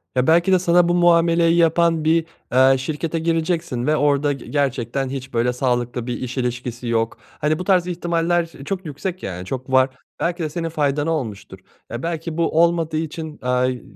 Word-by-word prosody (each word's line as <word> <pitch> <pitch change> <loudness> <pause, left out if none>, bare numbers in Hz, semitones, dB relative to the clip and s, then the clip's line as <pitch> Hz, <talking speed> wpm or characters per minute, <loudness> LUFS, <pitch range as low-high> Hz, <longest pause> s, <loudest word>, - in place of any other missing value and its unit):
Ya 125 0 +2
belki 170 +3 +4
de 185 - +5
sana 175 0 +4
bu - - +3
muameleyi 170 -1 +4
yapan 165 -1 +3
bir, 160 +1 +2 0.3
eee, 130 +1 +5
şirkete 155 +4 -3
gireceksin 165 -5 -1
ve 155 - +3
orada 145 -1 +2
ge 135 - -10
gerçekten 135 -2 -1
hiç 130 -1 -6
böyle 120 +1 +1
sağlıklı 120 -1 -1
bir 125 - -2
iş 130 +1 -5
ilişkisi 125 -1 -3
yok. 115 -1 0 0.2
Hani 155 +1 +1
bu - - -3
tarz 180 -2 +2
ihtimaller 170 -1 0 0.2
çok 190 +1 -4
yüksek, 170 +5 -5
yani 90 -1 -5
çok 130 +6 -5
var, 130 0 +4 0.3
belki 175 0 -1
de 155 - -2
senin 165 +2 -3
faydana 150 0 0
olmuştur. 105 - -4 0.3
Ya 120 +2 -6
belki 165 -1 -4
bu 165 -1 +2
olmadığı 165 -2 +1
için, 160 -1 -5
eee, 125 0 +1
g 125 - -9
155 Hz, 185 wpm, -21 LUFS, 130-170 Hz, 0.3 s, de